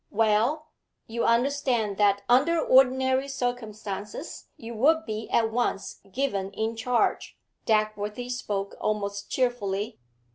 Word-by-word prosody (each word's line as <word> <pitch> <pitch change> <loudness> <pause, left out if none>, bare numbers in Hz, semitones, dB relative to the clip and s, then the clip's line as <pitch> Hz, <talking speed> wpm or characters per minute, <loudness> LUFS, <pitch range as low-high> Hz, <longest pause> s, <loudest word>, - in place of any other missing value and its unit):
'Well, 225 +8 +1 0.3
you 230 +1 -2
understand 240 -4 +1
that 200 -1 +3
under 290 +8 +4
ordinary 260 0 +4
circumstances 220 - -5
you 230 +1 -8
would 315 +8 +3
be 220 0 -5
at 225 -1 +2
once 200 -5 -2
given 200 -6 -1
in 220 +3 -2
charge.' 235 +1 0 0.3
Dagworthy 215 +2 0
spoke 200 -5 -3
almost 200 -1 -2
cheerfully. 225 -4 -1
225 Hz, 110 wpm, -27 LUFS, 210-255 Hz, 0.3 s, under